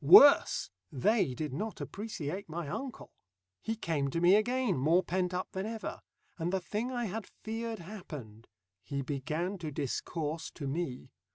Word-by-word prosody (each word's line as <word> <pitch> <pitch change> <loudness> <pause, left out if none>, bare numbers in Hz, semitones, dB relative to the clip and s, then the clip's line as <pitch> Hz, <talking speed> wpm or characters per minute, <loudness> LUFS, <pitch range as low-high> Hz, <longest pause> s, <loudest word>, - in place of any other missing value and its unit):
Worse! 230 - +8 0.2
They 140 - +2
did 150 0 -3
not 215 +9 -3
appreciate 195 -4 -4
my 165 0 -3
uncle. 260 - -5 0.5
He 225 - -1
came 160 -9 0
to 165 - -1
me 175 +2 +7
again, 245 0 +2
more 160 +7 +4
pent 180 0 0
up 180 0 -2
than 190 +2 -2
ever, 225 -1 -4 0.4
and 165 +2 0
the 190 - +2
thing 215 +7 -2
I 240 -2 -1
had 215 +1 -4
feared 225 +1 -4
happened. 150 - -8 0.4
He 140 -1 -2
began 155 +8 -2
to 160 -2 -3
discourse 150 +3 -2
to 140 - -4
me. 135 -3 -3
175 Hz, 160 wpm, -32 LUFS, 150-215 Hz, 0.5 s, Worse